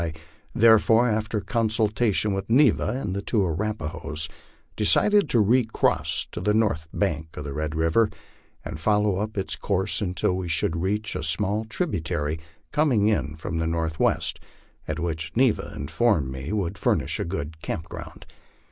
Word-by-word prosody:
I 80 -2 -2 0.4
therefore, 115 +1 +5
after 110 -1 -1
consultation 110 -2 +1
with 95 +1 -4
Neva 125 0 +4
and 95 -8 -3
the 100 - -2
two 105 -1 +1
Arapahoes, 80 -4 -3 0.5
decided 205 - +4
to 120 - +3
recross 115 +2 +2
to - - -5
the 105 0 +1
north 105 -8 +1
bank 80 -5 -2
of 75 - -5
Red 75 +2 -3
river, 80 +8 +2 0.6
and 75 - -6
follow 105 +2 +2
up 105 +1 -3
its 95 - -1
course 100 +1 -1
until 90 -1 0
we 95 -1 -3
should 80 0 0
reach 105 +4 -1
a - - -2
small 100 +7 +1
tributary 80 - -2 0.3
coming 130 -9 +3
in 75 -8 -1
from 85 +1 -4
the 80 - 0
northwest, 80 -1 0 0.5
and - - -3
which 80 -1 -3
Neva 130 -3 +2
informed 80 - +1
me 65 +5 -6
would 100 -2 -2
furnish - - 0
a - - 0
good 80 -3 -5
camp 80 0 -4
ground. - - -9
100 Hz, 155 wpm, -25 LUFS, 80-110 Hz, 0.6 s, therefore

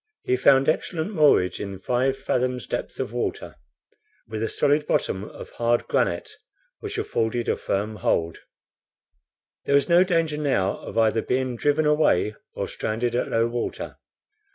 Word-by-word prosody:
He 125 - +1
found 135 +1 +4
excellent 160 +4 -1
moorage 145 - +4
in 100 -1 -5
five 125 +6 0
fathoms' 125 -1 -1
depth - - -5
of - - -3
water, - - -3 0.7
with 110 0 -5
a 115 - -1
solid 150 +1 +1
bottom 95 - 0
of - - -10
hard 120 0 0
granite, - - -1 0.4
which - - -6
afforded 115 +1 -1
a - - +2
firm 105 +2 -2
hold. 85 -3 0 1.3
There 140 - +2
was 140 -1 +3
no 175 +1 +6
danger 165 -4 0
now 135 -11 +1
of - - -8
either 110 0 +3
being 130 0 -1
driven 145 +5 +1
away 150 - +3 0.2
or - - -2
stranded 115 +2 -2
at 120 - 0
low 115 0 +2
water. 120 0 -4
125 Hz, 155 wpm, -24 LUFS, 110-145 Hz, 1.3 s, no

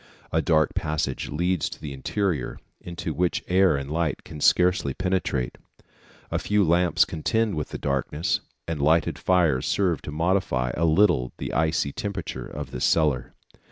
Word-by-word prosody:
A 80 - +2
dark 80 -2 +2
passage 75 -1 -2
leads 90 +2 0
to - - -10
the 75 -3 -6
interior, 80 +1 -2 0.2
into 85 -2 -5
which 85 +4 0
air 95 -3 +4
and 70 +1 -5
light 80 -1 -1
can 75 -2 -9
scarcely 90 -7 +3
penetrate. 90 -9 -1 0.7
A - - 0
few 105 0 +2
lamps 85 +1 +3
contend 110 +7 0
with 75 -2 -3
the - - -5
darkness, 75 +6 -1 0.3
and 80 -3 -3
lighted 80 +2 +2
fires 85 -8 +2
serve 90 -5 +1
to - - -7
modify 80 -6 0
a 85 - +1
little 80 -6 +3
the - - -5
icy 80 -2 +1
temperature 100 -2 -5
of - - -7
this 60 - -4
cellar. 75 -6 +1
80 Hz, 155 wpm, -25 LUFS, 75-90 Hz, 0.7 s, air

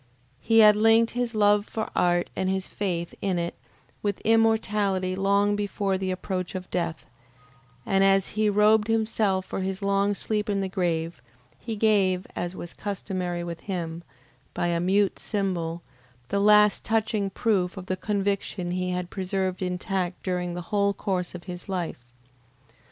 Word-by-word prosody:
He 225 - +4
had 210 -1 +8
linked 225 +2 +4
his 245 -1 -2
love 205 0 +3
for 220 -1 -3
art 175 0 +2
and 190 - 0
his 190 0 -1
faith 175 -4 -3
in 190 -3 0
it 170 0 -2 0.5
with 205 -2 -1
immortality 210 -4 +2
long 200 +1 +2
before 200 -1 -1
the 190 0 -2
approach 185 0 -3
of 185 0 -5
death, 170 -3 -2 0.8
and 195 0 +3
as 195 0 +4
he 215 0 +1
robed 210 +1 +4
himself 215 -4 +1
for - - -4
his 190 +1 -3
long 200 +1 +2
sleep 210 +1 -2
in 200 -1 +1
the 195 - -1
grave, 170 -3 -2 0.4
he 225 -2 -5
gave, 200 -4 +2
as 175 +1 -3
was 175 - -8
customary 185 -3 -3
with 170 -1 -6
him, 170 -4 -4 0.5
by 175 - 0
a 170 -1 +1
mute 195 +3 +2
symbol, 175 -5 -2 0.5
the 200 - 0
last 210 0 +5
touching 220 -2 0
proof 195 -2 0
of 185 - -6
the 185 - -1
conviction 200 -2 -2
he 180 0 -1
had 180 -1 -3
preserved 190 -1 -2
intact 180 0 -2
during 180 -1 -2
the 175 - -4
whole 200 -1 +2
course 180 -3 -2
of 175 - -8
his 180 +1 -8
life. 175 -9 -3
195 Hz, 160 wpm, -26 LUFS, 180-210 Hz, 0.8 s, had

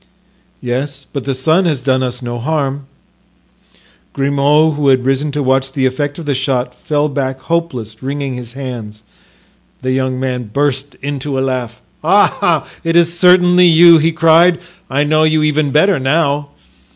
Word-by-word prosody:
"Yes, 135 +3 -4
but 140 -3 -4
the 135 -1 -2
son 160 +8 +1
has 150 -7 -1
done 130 -1 +1
us 125 0 -3
no 120 0 -5
harm." 140 0 -2 1.3
Grimaud, 140 +3 +2
who 145 -1 -1
had 130 -2 +3
risen 135 +2 0
to 145 -1 -2
watch 135 0 0
the 135 -2 0
effect 145 +3 -2
of 170 - -8
the 145 - 0
shot, 130 -1 -2
fell 150 0 -1
back 135 -2 -3
hopeless, 130 -11 -3
wringing 140 0 -4
his 120 -1 -8
hands. 120 -6 -8 0.8
The 130 - -1
young 130 -1 -1
man 125 -2 -3
burst 140 +1 -2
into 140 -1 -4
a - - 0
laugh. 125 - -4 0.2
"Ah, - - +2 0.2
it 165 0 -1
is 170 0 +3
certainly 180 0 +5
you!" 170 0 +7
he 165 +2 +1
cried. 165 +2 +4 0.3
"I 140 +2 +1
know 155 +1 +1
you 155 0 +2
even 150 -1 +1
better 160 +5 +2
now." 145 +1 0
140 Hz, 165 wpm, -15 LUFS, 130-155 Hz, 1.3 s, you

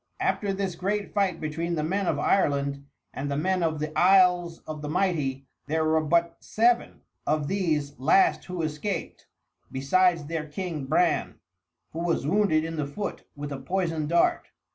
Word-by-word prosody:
After 200 -2 0
this 195 -1 -2
great 200 +4 -2
fight 195 -5 +1
between 165 +3 -2
the 155 - -1
men 190 +4 -1
of 155 - +1
Ireland 140 -4 +1 0.3
and 140 +2 -4
the 140 - -1
men 185 +4 +1
of 160 -2 0
the 155 +1 -4
Isles 180 -2 +4
of 155 -1 -6
the 150 - -5
Mighty 150 -7 0 0.2
there 160 +1 0
were 160 0 +3
but 170 +2 +1
seven 235 +2 +1 0.3
of 150 -1 +1
these 155 -8 -1
last 155 +8 +3
who 180 -2 -4
escaped, 155 +6 -4 0.4
besides 170 +4 +2
their 160 0 -4
king 155 -3 -5
Bran, 160 +3 +1 0.6
who 160 - -6
was 170 -4 0
wounded 165 -2 +2
in 165 0 -4
the 150 -2 -1
foot 200 +9 -5
with 145 0 -6
a 140 - -4
poisoned 165 0 -2
dart. 170 0 +2
165 Hz, 165 wpm, -26 LUFS, 150-185 Hz, 0.6 s, Isles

